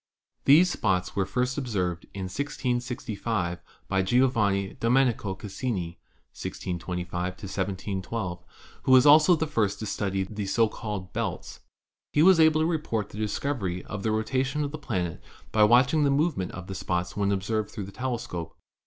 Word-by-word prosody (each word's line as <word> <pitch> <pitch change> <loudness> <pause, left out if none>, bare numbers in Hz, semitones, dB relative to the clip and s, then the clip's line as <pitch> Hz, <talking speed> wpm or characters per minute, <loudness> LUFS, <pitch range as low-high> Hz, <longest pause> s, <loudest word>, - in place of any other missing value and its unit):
These 170 +6 +6
spots 95 - 0
were 95 -1 0
first 125 +7 -1
observed 90 -10 -2
in 95 - -6
1665 115 -5 -2 0.3
by 95 -1 +1
Gio 125 +7 +3
vanni 100 -4 0
Domenico 115 -5 +2
Cassini 95 -4 -4 0.3
(1625 90 0 -4
1712), 95 -1 -4 0.4
who - - 0
was 130 +1 +7
also 155 +4 +7
the 160 - -1
first 110 -10 0
to 110 - -5
study 100 -2 -1
the 100 +1 -5
so 115 +3 +3
called 105 -4 -6
belts. - - -4 0.5
He 150 - +4
was 185 -1 +7
able 160 -1 +5
to - - +3
report 150 - -1
the 105 - -9
discovery 105 -4 -2
of 105 - -5
the 110 - 0
rotation 130 +6 0
of 140 - -3
the 155 - -6
planet 90 - -3 0.3
by 110 - +4
watching 130 +7 +4
the 140 - +3
movement 140 - 0
of 95 0 -7
the 95 - -6
spots 90 -1 -2
when 100 -1 +1
observed 105 +2 -1
through 105 - -6
the 95 - -8
tele 125 +3 -2
scope. 85 -7 -7
105 Hz, 160 wpm, -27 LUFS, 95-130 Hz, 0.5 s, was